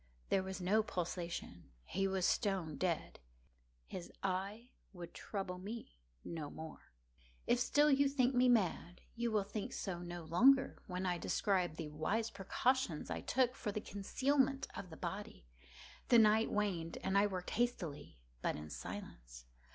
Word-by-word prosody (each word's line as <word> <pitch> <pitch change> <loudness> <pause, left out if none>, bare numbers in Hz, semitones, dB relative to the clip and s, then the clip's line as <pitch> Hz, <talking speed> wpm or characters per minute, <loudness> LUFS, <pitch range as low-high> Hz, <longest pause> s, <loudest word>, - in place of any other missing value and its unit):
There 195 - +3
was 190 -1 -5
no 195 +5 +3
pulsation. 175 - -4 0.2
He 195 - 0
was 190 -2 0
stone 190 -8 +1
dead. 175 -1 -1 0.7
His 175 - -7
eye 200 +6 -2 0.2
would 175 -2 -8
trouble 190 -3 -4
me 215 - -7 0.3
no 155 -3 -4
more. 160 +1 -9 0.5
If 240 - +3
still 295 +4 +4
you 275 0 +5
think 265 -2 +2
me 250 0 +5
mad, 185 -6 +1
you 235 0 0
will 215 -2 +2
think 205 +1 -5
so 180 -3 -3
no 175 -1 -6
longer 260 +12 +4
when 180 0 -3
I 175 -1 0
describe 180 -1 +1
the 160 -1 -5
wise 210 +10 -1
precautions 240 - 0
I - - -2
took 255 -1 +2
for 210 - -3
the 215 - -2
concealment 270 +7 +1
of 185 - -6
the 160 - -10
body. 190 - -5 0.6
The 240 - +7
night 220 0 +5
waned, 180 -6 -1
and 190 - 0
I 200 +1 +5
worked 185 -3 -4
hastily, 170 - -2 0.2
but - - 0
in 75 0 -7
silence. - - -8
195 Hz, 155 wpm, -37 LUFS, 175-230 Hz, 0.7 s, The